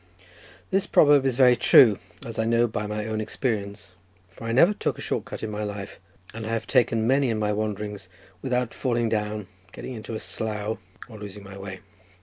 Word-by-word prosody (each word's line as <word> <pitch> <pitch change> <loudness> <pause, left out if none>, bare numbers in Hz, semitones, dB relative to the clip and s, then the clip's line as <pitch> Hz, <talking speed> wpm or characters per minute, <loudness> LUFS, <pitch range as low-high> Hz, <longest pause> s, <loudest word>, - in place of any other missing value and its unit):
This 195 +1 +1
proverb 145 -2 +5
is 125 -2 -1
very 125 -2 +6
true, 120 -3 +6 0.3
as 115 -1 -6
I 110 - +1
know 115 +1 +3
by 105 -2 -3
my 105 0 -3
own 110 -1 -2
experience, 105 -4 -3 0.4
for 95 +4 -11
I 115 - -1
never 170 - +5
took - - -2
a - - -8
short - - -2
cut - - -7
in 110 - -3
my 105 0 -3
life, 100 -1 -6 0.3
and 115 0 -6
I - - -3
have 115 -1 -1
taken 115 -2 +2
many 135 +2 +3
in 110 - 0
my 105 -1 0
wanderings, 105 -1 -4 0.3
without 125 -2 -1
falling 120 -3 0
down, 105 -1 -2 0.3
getting 130 - -7
into 115 -1 -6
a - - -3
slough, 105 +3 -3 0.3
or 110 -3 -11
losing 105 -1 -8
my 100 0 -10
way. 95 -1 -8
110 Hz, 200 wpm, -25 LUFS, 105-120 Hz, 0.4 s, very